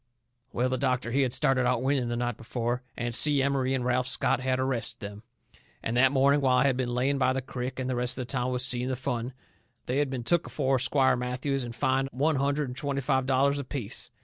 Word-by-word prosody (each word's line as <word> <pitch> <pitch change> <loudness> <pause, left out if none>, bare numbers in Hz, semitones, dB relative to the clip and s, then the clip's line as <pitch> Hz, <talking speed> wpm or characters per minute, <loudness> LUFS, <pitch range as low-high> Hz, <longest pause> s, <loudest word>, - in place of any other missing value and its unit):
Well, 125 +2 0
the 130 0 -1
doctor, 125 -3 0
he 135 +3 +2
had 130 -3 +1
started 130 -1 +2
out 125 -1 +1
winning 130 -3 +1
the 120 - -1
night 120 -1 -2
before. 120 +2 -3 0.2
And 120 0 -2
Si 145 +2 +4
Emery 135 -1 +1
and 125 -2 -2
Ralph 125 0 +1
Scott - - +1
had 130 0 0
arrested 125 -2 -2
them. 100 -1 -8 0.6
And 115 - -2
that 130 +1 +5
morning, 140 +1 +3
while 130 -2 +3
I - - +4
had 135 -2 +3
been 125 -1 -2
laying 135 +3 +1
by 130 -1 +3
the 135 - -2
crick 125 0 -5
and 130 - -2
the 130 - -1
rest 125 +1 0
of 130 - -3
the - - -8
town 130 -1 -1
was 125 +1 +1
seeing 125 -1 +1
the 130 - -1
fun, 125 -1 -3 0.5
they 130 +3 0
had 145 -2 +1
been 130 -2 -4
took 170 +8 +1
afore 135 -2 0
Squire 130 +2 +3
Matthews 125 +2 -2
and 120 -1 -7
fined 135 +2 +1
one 145 +3 +1
hundred 140 +1 0
and 125 - -7
twenty 140 0 -2
five 130 -1 0
dollars 140 +2 +2
apiece. 130 -5 -5
130 Hz, 240 wpm, -28 LUFS, 125-135 Hz, 0.6 s, that